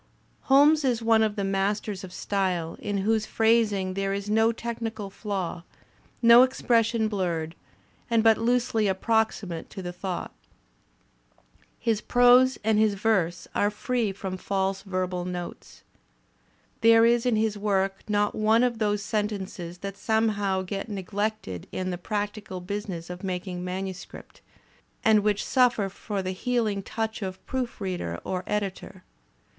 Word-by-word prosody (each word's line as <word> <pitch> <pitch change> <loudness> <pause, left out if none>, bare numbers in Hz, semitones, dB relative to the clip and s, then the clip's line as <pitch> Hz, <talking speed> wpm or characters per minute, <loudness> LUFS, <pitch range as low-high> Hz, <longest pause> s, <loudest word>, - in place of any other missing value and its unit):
Holmes 290 +3 +5
is 240 -4 0
one 225 -1 +4
of 215 -1 +1
the 200 - -2
masters 195 +1 -1
of 185 - -8
style 180 -4 -1
in 205 -1 -2
whose 220 0 +1
phrasiag 220 -4 +2
there 195 0 -1
is 200 +1 -4
no 220 +1 +4
technical 225 -3 -5
flaw, 190 -5 -4 0.6
no 235 +1 +9
expression 230 -3 +2
blurred 170 -6 -2 0.6
and 230 -2 +3
but 225 -1 +5
loosely 230 -2 +1
approximate 195 -3 0
to 190 - -8
the 175 0 -5
thought. 180 0 -5 1.4
His 220 -2 0
prose 245 +2 +5
and 215 0 +3
his 215 -2 +3
verse 190 -5 0
are 205 - +2
free 225 +1 -1
from 190 -1 -5
false 195 0 -1
verbal 185 -2 -2
notes. 180 -1 -7 1.0
There 230 0 +7
is 235 0 +3
in 240 - +3
his 215 -1 +1
work 195 -2 0
not 205 0 +1
one 220 +2 +3
of 240 -2 0
those 210 -2 0
sentences 195 -5 -3
that 195 0 -5
somehow 205 -4 +1
get 195 +4 -5
neglected 200 - -3
in 185 0 -3
the 175 - -4
practical 205 -1 -4
business 180 -2 -5
of 180 +2 -8
making 180 -1 -4
manuscript, 190 +1 -7 0.6
and 220 -1 +6
which 205 0 0
suffer 245 -6 +3
for 200 0 -4
the 185 - -2
healing 215 0 -1
touch 220 +2 -4
of 190 -1 -6
proofreader 190 - -3
or 185 -1 -3
editor. 195 -2 -4
205 Hz, 140 wpm, -26 LUFS, 190-225 Hz, 1.4 s, no